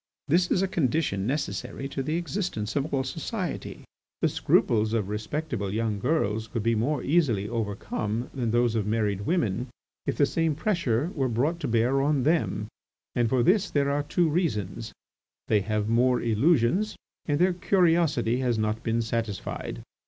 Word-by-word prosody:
This 175 Hz, +4 st, +3 dB
is 185 Hz, -, +2 dB
a -, -, +2 dB
condition 135 Hz, -, 0 dB
necessary 135 Hz, 0 st, -3 dB
to 135 Hz, -, -3 dB
the 155 Hz, +4 st, -1 dB
existence 170 Hz, -, -3 dB
of 145 Hz, +2 st, -1 dB
all 135 Hz, -1 st, +1 dB
society. 170 Hz, -, -4 dB, 0.4 s
The -, -, +4 dB
scruples 110 Hz, -1 st, +2 dB
of 105 Hz, -4 st, 0 dB
respectable 110 Hz, -1 st, -3 dB
young 110 Hz, -1 st, -1 dB
girls 110 Hz, -5 st, 0 dB
could 115 Hz, 0 st, -3 dB
be 115 Hz, +1 st, +2 dB
more 125 Hz, +6 st, 0 dB
easily 135 Hz, -, +2 dB
overcome 110 Hz, +1 st, -3 dB
than 125 Hz, -4 st, -1 dB
those 120 Hz, 0 st, +2 dB
of 110 Hz, -3 st, -1 dB
married 105 Hz, -2 st, 0 dB
women 125 Hz, -, 0 dB, 0.4 s
if -, -, -1 dB
the 145 Hz, -, +5 dB
same 160 Hz, +1 st, 0 dB
pressure 160 Hz, -, 0 dB
were 135 Hz, -4 st, 0 dB
brought 140 Hz, +9 st, 0 dB
to -, -, -2 dB
bear 120 Hz, +4 st, +2 dB
on 140 Hz, -2 st, +2 dB
them, 150 Hz, -8 st, +1 dB, 0.5 s
and 120 Hz, -2 st, +1 dB
for 125 Hz, -1 st, +2 dB
this 195 Hz, -, +3 dB
there 140 Hz, -1 st, +1 dB
are 145 Hz, +1 st, +1 dB
two 165 Hz, +4 st, +1 dB
reasons: 115 Hz, -, -1 dB, 0.6 s
they 105 Hz, -2 st, +4 dB
have 105 Hz, +1 st, -1 dB
more 120 Hz, +2 st, +3 dB
illusions, 150 Hz, -, +2 dB, 0.3 s
and 145 Hz, -2 st, +1 dB
their 180 Hz, +3 st, +3 dB
curiosity 165 Hz, -, +2 dB
has 125 Hz, -3 st, +1 dB
not 110 Hz, +1 st, -1 dB
been 115 Hz, +1 st, 0 dB
satisfied. 110 Hz, -3 st, -4 dB
125 Hz, 165 wpm, -27 LUFS, 110-160 Hz, 0.6 s, the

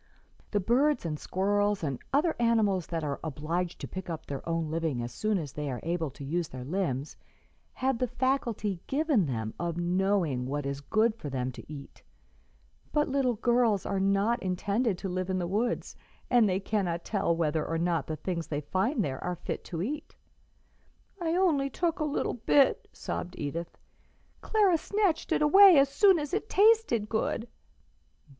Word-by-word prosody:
The 205 Hz, -, +1 dB
birds 245 Hz, +5 st, +2 dB
and 155 Hz, -2 st, -3 dB
squirrels 205 Hz, +1 st, 0 dB
and 140 Hz, -4 st, -2 dB
other 310 Hz, +4 st, +2 dB
animals 215 Hz, -7 st, +2 dB
that 165 Hz, -2 st, -3 dB
are 145 Hz, -2 st, -3 dB
obliged 165 Hz, +4 st, -3 dB
to -, -, -4 dB
pick 185 Hz, -1 st, -7 dB
up 165 Hz, -2 st, -5 dB
their 140 Hz, -1 st, -5 dB
own 165 Hz, -2 st, -1 dB
living 160 Hz, -5 st, -1 dB
as 120 Hz, -, -6 dB
soon 215 Hz, -1 st, 0 dB
as 150 Hz, -7 st, -5 dB
they 150 Hz, -1 st, -4 dB
are 125 Hz, -2 st, -3 dB
able 165 Hz, -2 st, -1 dB
to 140 Hz, +2 st, -11 dB
use 165 Hz, +4 st, -1 dB
their 130 Hz, -2 st, -8 dB
limbs 145 Hz, -3 st, -2 dB, 0.6 s
have 265 Hz, -2 st, -1 dB
the 250 Hz, -, +1 dB
faculty 240 Hz, -6 st, -1 dB
given 280 Hz, -, +2 dB
them 110 Hz, -4 st, -3 dB
of 170 Hz, -1 st, -2 dB
knowing 175 Hz, -7 st, +1 dB
what 145 Hz, +1 st, -3 dB
is 140 Hz, 0 st, -3 dB
good 215 Hz, +9 st, +2 dB
for 155 Hz, -10 st, -7 dB
them 130 Hz, -1 st, -2 dB
to 130 Hz, -, -12 dB
eat, 140 Hz, -2 st, -10 dB, 0.9 s
but 295 Hz, -1 st, +1 dB
little 265 Hz, -3 st, +1 dB
girls 235 Hz, -3 st, +2 dB
are 195 Hz, -, -1 dB
not 200 Hz, +5 st, +2 dB
intended 200 Hz, +3 st, 0 dB
to 195 Hz, -, -5 dB
live 185 Hz, 0 st, -3 dB
in 190 Hz, -, 0 dB
the 180 Hz, -, -1 dB
woods, 215 Hz, +7 st, -1 dB, 0.4 s
and 240 Hz, -4 st, +5 dB
they 185 Hz, 0 st, +1 dB
cannot 190 Hz, -5 st, -2 dB
tell 195 Hz, -5 st, 0 dB
whether 160 Hz, -2 st, 0 dB
or 165 Hz, -, -2 dB
not 170 Hz, -2 st, 0 dB
the 155 Hz, -, -3 dB
things 170 Hz, 0 st, -4 dB
they 145 Hz, -1 st, -2 dB
find 195 Hz, -, 0 dB
there 130 Hz, -2 st, -4 dB
are 180 Hz, -, -2 dB
fit 175 Hz, -, -5 dB
to 170 Hz, 0 st, -4 dB
eat." 295 Hz, +8 st, -5 dB, 1.1 s
"I 330 Hz, -1 st, 0 dB, 0.4 s
took 335 Hz, +3 st, -1 dB
only 300 Hz, -1 st, 0 dB
a -, -, -2 dB
little -, -, 0 dB
bit," 265 Hz, +4 st, +3 dB
sobbed 180 Hz, +1 st, -5 dB
Edith; 165 Hz, +4 st, -5 dB, 0.6 s
"Clara 400 Hz, -6 st, +3 dB
snatched 395 Hz, -5 st, 0 dB
it -, -, +2 dB
away 385 Hz, +3 st, +8 dB
as 275 Hz, 0 st, +5 dB
soon 375 Hz, +6 st, +5 dB
as 295 Hz, -1 st, -4 dB
it 430 Hz, +2 st, -2 dB
tasted 420 Hz, -, +4 dB
good." 225 Hz, +1 st, -1 dB
190 Hz, 180 wpm, -29 LUFS, 160-245 Hz, 1.1 s, away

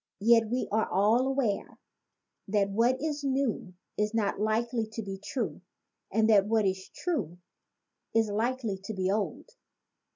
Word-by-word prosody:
Yet 230 Hz, 0 st, +5 dB
we 250 Hz, +2 st, -1 dB
are 220 Hz, +1 st, +1 dB
all 215 Hz, +7 st, +3 dB
aware 265 Hz, -7 st, -1 dB, 0.7 s
that 200 Hz, -1 st, +1 dB
what 235 Hz, +5 st, +2 dB
is 300 Hz, -1 st, -3 dB
new 265 Hz, -9 st, -1 dB, 0.2 s
is 210 Hz, +1 st, 0 dB
not 205 Hz, -3 st, 0 dB
likely 225 Hz, +2 st, 0 dB
to 225 Hz, -, -4 dB
be 195 Hz, -1 st, -6 dB
true 200 Hz, -, -3 dB, 0.5 s
and 220 Hz, +2 st, +3 dB
that 205 Hz, -3 st, +5 dB
what 220 Hz, -1 st, +2 dB
is 190 Hz, 0 st, -2 dB
true 215 Hz, -, -3 dB, 0.8 s
is 225 Hz, -1 st, +4 dB
likely 225 Hz, -1 st, -1 dB
to 220 Hz, -, -5 dB
be 190 Hz, 0 st, 0 dB
old. 205 Hz, 0 st, -2 dB
220 Hz, 150 wpm, -29 LUFS, 200-240 Hz, 0.8 s, Yet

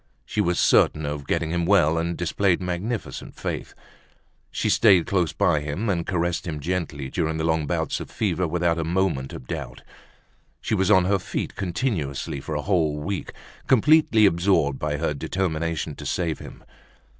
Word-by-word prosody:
She -, -, -1 dB
was 90 Hz, 0 st, +1 dB
certain 80 Hz, -1 st, +4 dB
of 75 Hz, -1 st, -4 dB
getting 80 Hz, -1 st, 0 dB
him 85 Hz, 0 st, 0 dB
well 85 Hz, -3 st, +3 dB
and 85 Hz, +1 st, -2 dB
displayed 90 Hz, +1 st, +1 dB
magnificent 95 Hz, +6 st, -4 dB
faith. -, -, -5 dB, 0.7 s
She -, -, -2 dB
stayed 95 Hz, -7 st, +5 dB
close 90 Hz, -5 st, +1 dB
by 75 Hz, -, +2 dB
him 75 Hz, +10 st, -3 dB
and 85 Hz, -3 st, -2 dB
caressed 85 Hz, -2 st, -1 dB
him 75 Hz, -3 st, -3 dB
gently 75 Hz, -4 st, -3 dB
during 80 Hz, -2 st, -1 dB
the 80 Hz, -, -2 dB
long 80 Hz, -2 st, +1 dB
bouts -, -, -1 dB
of -, -, -7 dB
fever 90 Hz, -4 st, -1 dB
without 85 Hz, 0 st, 0 dB
a -, -, 0 dB
moment 80 Hz, -5 st, 0 dB
of 65 Hz, -, -9 dB
doubt. -, -, -6 dB, 0.8 s
She -, -, -3 dB
was 95 Hz, -2 st, +2 dB
on 95 Hz, -4 st, +5 dB
her 100 Hz, +1 st, +2 dB
feet -, -, -4 dB
continuously 85 Hz, -, -2 dB
for 80 Hz, -, -5 dB
a 75 Hz, -, -2 dB
whole 80 Hz, -6 st, +1 dB
week, 95 Hz, +6 st, -4 dB, 0.4 s
completely 140 Hz, -3 st, +5 dB
absorbed 85 Hz, -6 st, +2 dB
by 75 Hz, -1 st, -1 dB
her 75 Hz, 0 st, -1 dB
determination 80 Hz, 0 st, -2 dB
to -, -, -8 dB
save 85 Hz, -4 st, -1 dB
him. -, -, -11 dB
85 Hz, 170 wpm, -24 LUFS, 80-95 Hz, 0.8 s, stayed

